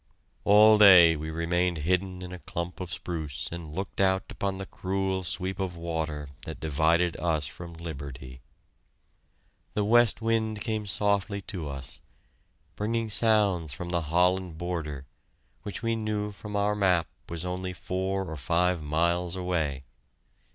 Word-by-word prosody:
All 105 +1 +7
day 90 -5 +9
we 80 +1 -5
remained 85 +2 0
hidden 90 +1 0
in 90 - -7
a 90 - -7
clump 85 +1 -5
of 90 -2 -5
spruce 80 -5 -4
and 85 -3 -7
looked 95 +4 -3
out 95 0 +3
upon 100 -1 -2
the 95 - -5
cruel 95 0 -2
sweep 95 +2 -2
of 90 -3 -3
water 80 -3 -3 0.2
that 80 - -7
divided 80 +3 +2
us 80 -4 0
from 85 -1 -8
liberty. 70 -5 -8 1.3
The 105 - +1
west 120 +1 +4
wind 110 -1 0
came 110 0 -2
softly 100 +1 0
to 80 -6 -4
us, 70 -2 -7 0.7
bringing 115 +1 -1
sounds 100 -9 +4
from 85 +7 -6
the 85 -1 0
Holland 90 +2 +1
border, 80 -6 -4 0.6
which 100 +3 -6
we 115 0 +1
knew 105 -1 -2
from 105 +1 -8
our 100 +1 +2
map 90 -5 +2 0.2
was 85 +1 -3
only 90 +1 -3
four 95 +2 -2
or 80 -2 -6
five 85 +4 +1
miles 85 +4 0
away! 80 -7 -1
90 Hz, 145 wpm, -28 LUFS, 80-100 Hz, 1.3 s, day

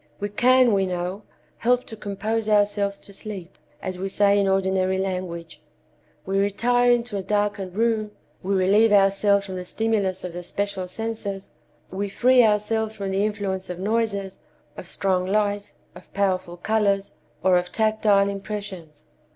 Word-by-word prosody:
We 205 - -2
can, 250 +2 +4
we 195 -1 +2
know, 180 +2 -3 0.4
help 245 +1 +1
to 220 - -8
compose 215 +2 -3
ourselves 205 -1 +2
to 200 - -14
sleep, 195 -4 -8 0.3
as 185 -1 -4
we 195 +1 -3
say 200 +1 +3
in 200 - +2
ordinary 190 -1 +1
language. 180 -3 -4 0.6
We 195 +1 0
retire 245 +5 +2
into 235 -3 0
a - - -2
darkened 205 -1 -1
room, 220 -1 +1 0.3
we 195 +1 -1
relieve 205 +4 +4
ourselves 200 0 +4
from 190 -2 -6
the 180 - -4
stimulus 200 -2 -1
of 180 -2 -5
the 175 - -5
special 195 +1 -3
senses, 205 -1 -5 0.4
we 200 +2 -3
free 250 +4 +4
ourselves 220 +1 +1
from 195 -1 -4
the 195 +1 +1
influence 200 -3 -2
of 180 - -4
noises, 200 -1 -1 0.4
of - - -8
strong 185 -2 0
light, 205 0 0 0.2
of - - -15
powerful 185 -3 0
colors, 200 0 0 0.3
or 185 0 +4
of 180 0 0
tactile 215 -2 +3
impressions. 195 -6 -6
200 Hz, 155 wpm, -24 LUFS, 190-215 Hz, 0.6 s, can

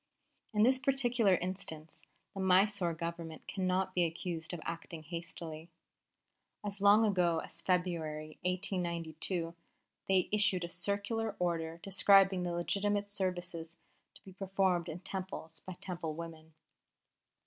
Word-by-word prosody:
In 210 -2 +3
this 260 +2 +5
particular 245 -7 +3
instance 170 -4 -4 0.3
the 195 - -6
Mysore 190 -2 +3
Government 170 -1 -5
cannot 185 0 0
be 180 - +3
accused 165 0 -3
of 175 - -4
acting 165 -1 -5
hastily. 165 0 -6 1.0
As 200 -1 -5
long 205 +2 +7
ago 180 -5 +3
as - - -10
February, 160 -4 -1
1892, 175 -2 -1 0.6
they 190 -2 +4
issued 210 -4 +3
a 170 - -4
circular 205 +5 -1
order 165 -2 -1
describing 195 -1 +5
the 175 -1 -1
legitimate 205 +4 0
services 180 -4 -3 0.4
to - - -15
be 190 - -12
performed 190 -3 +1
in 165 +3 -6
Temples 185 -4 -5
by 185 - -8
Temple 170 -3 -5
women. 160 -1 -9
180 Hz, 125 wpm, -33 LUFS, 165-195 Hz, 1.0 s, long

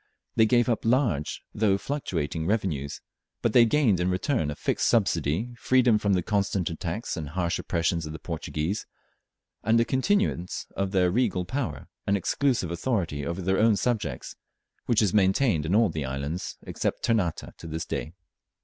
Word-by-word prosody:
They 110 -1 +5
gave 120 +1 +3
up 120 -3 0
large 115 - +1
though 100 -2 +2
fluctuating 85 - -3
revenues, 85 -10 -1 0.4
but 115 - +1
they 120 -1 +7
gained 115 - +3
in 90 +1 +1
return 95 - 0
a 75 - -4
fixed - - 0
subsidy, 95 - +1
freedom 125 -4 +4
from 100 -1 +1
the 90 -2 +1
constant 100 -3 0
attacks 85 +6 -4
and 80 -4 -5
harsh 85 +2 -1
oppressions 85 -1 -1
of - - -6
the 80 - -6
Portuguese, 80 +3 -3 0.8
and 110 +2 +4
a 115 - +3
continuance 130 - 0
of 95 0 -1
their 90 -2 +2
regal 95 -5 +1
power 90 - -3 0.2
and 100 - +3
exclusive 120 -2 0
authority 85 - -1
over 85 +2 -3
their 95 +2 +1
own 110 -1 +5
subjects, 105 - -2 0.5
which 115 -2 +3
is 100 - +1
maintained 95 - +3
in 90 - +2
all 110 -1 +4
the 80 -3 -3
islands 70 +6 -4
except - - -3
Ternate 105 -8 0
to 85 - -9
this 80 +1 -4
day. 80 - -4
95 Hz, 165 wpm, -27 LUFS, 80-115 Hz, 0.8 s, they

